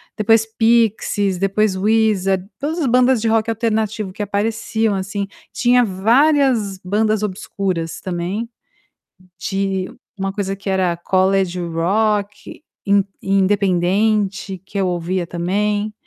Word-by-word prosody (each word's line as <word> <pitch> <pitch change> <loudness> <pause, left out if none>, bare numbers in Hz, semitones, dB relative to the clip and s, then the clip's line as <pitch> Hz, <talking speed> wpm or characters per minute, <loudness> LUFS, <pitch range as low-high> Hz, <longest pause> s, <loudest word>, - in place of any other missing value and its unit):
depois 225 0 +3
Pixies, 220 -4 +1
depois 195 +1 +1
Wizard, 195 -2 +1
todas 310 +4 -2
as 305 - 0
bandas 250 0 +3
de 225 - -1
rock 225 0 +1
alternativo 220 -3 -1
que 210 - -7
apareciam, 220 +2 -1
assim, 200 +1 -3 0.2
tinha 245 0 +3
várias 230 +1 +2
bandas 215 +2 +1
obscuras 185 -4 -3
também, 185 +5 -3 0.9
de 195 0 -2 0.2
uma 195 -1 -3
coisa 195 -1 -2
que 195 0 -5
era 185 -3 +1
College 185 +1 +1
Rock, 205 - -1 0.2
in 200 0 +4 0.2
independente, 195 +1 +1
que 200 - -6
eu 195 - +1
ouvia 175 0 -2
também, 205 +5 -1
200 Hz, 115 wpm, -19 LUFS, 190-220 Hz, 0.9 s, in